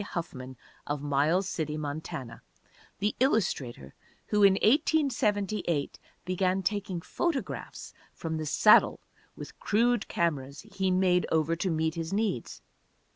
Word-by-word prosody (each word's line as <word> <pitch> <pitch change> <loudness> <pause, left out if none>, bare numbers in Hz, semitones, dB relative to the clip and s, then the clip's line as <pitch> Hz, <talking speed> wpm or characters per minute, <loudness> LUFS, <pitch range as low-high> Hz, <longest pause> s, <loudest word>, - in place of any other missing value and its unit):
Huffman, 130 -9 -6 0.3
of 145 -1 -3
Miles 150 +7 +1
City, 155 -4 -3
Montana, 145 -5 -6 0.6
the 210 +1 -1
illustrator 140 - 0 0.4
who 210 - +2
in 200 -1 +7
1878 210 - +1 0.3
began 185 +1 0
taking 195 -3 -2
photographs 320 - -4 0.2
from 160 -1 -4
the 155 -1 -4
saddle 210 +8 +5 0.4
with - - -10
crude 235 +1 +1
cameras 140 -5 -2
he 190 -1 -2
made 185 -1 +2
over 160 +1 +2
to 185 - -1
meet 160 -1 0
his 165 0 -4
needs. 200 - -2
180 Hz, 120 wpm, -29 LUFS, 150-205 Hz, 0.6 s, in